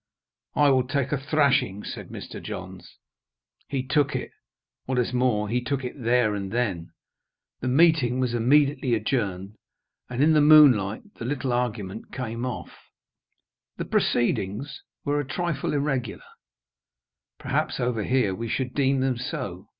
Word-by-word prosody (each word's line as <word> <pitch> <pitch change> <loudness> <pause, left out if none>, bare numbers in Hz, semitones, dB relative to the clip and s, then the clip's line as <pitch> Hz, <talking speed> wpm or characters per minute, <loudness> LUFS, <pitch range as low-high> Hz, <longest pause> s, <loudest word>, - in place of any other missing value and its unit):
"I 145 -1 +5
will 130 -1 +2
take 140 0 -1
a 150 - +1
thrashing," 135 -8 +1
said - - -7
Mr. - - -8
Johns. - - -8 0.7
He 135 -2 -2
took 145 0 +1
it. - - -4 0.5
What 130 0 -2
is 125 0 0
more, 125 -4 +1
he 120 +4 0
took 135 +1 -2
it 125 - -4
there 115 -2 +2
and 100 -2 -4
then. 100 -8 -1 0.7
The 125 - -4
meeting 135 -3 +3
was 125 -2 0
immediately 135 +1 +3
adjourned; 105 -4 -2 0.5
and 125 +2 0
in 160 +1 +5
the 150 - +5
moonlight, 140 -10 +6 0.2
the 115 - -5
little 130 -1 -2
argument 110 -4 -3
came 120 -1 -4
off. 125 - -6 1.0
The - - -3
proceedings 120 +4 0 0.2
were 145 0 +1
a - - 0
trifle 170 0 -2
irregular; 135 -6 -2 1.1
perhaps 145 +3 -2
over 120 -4 -1
here 125 -6 +1
we 115 +5 -4
should 130 0 -2
deem 135 -1 +2
them 130 -2 0
so. 125 - -5
125 Hz, 145 wpm, -25 LUFS, 115-140 Hz, 1.1 s, moonlight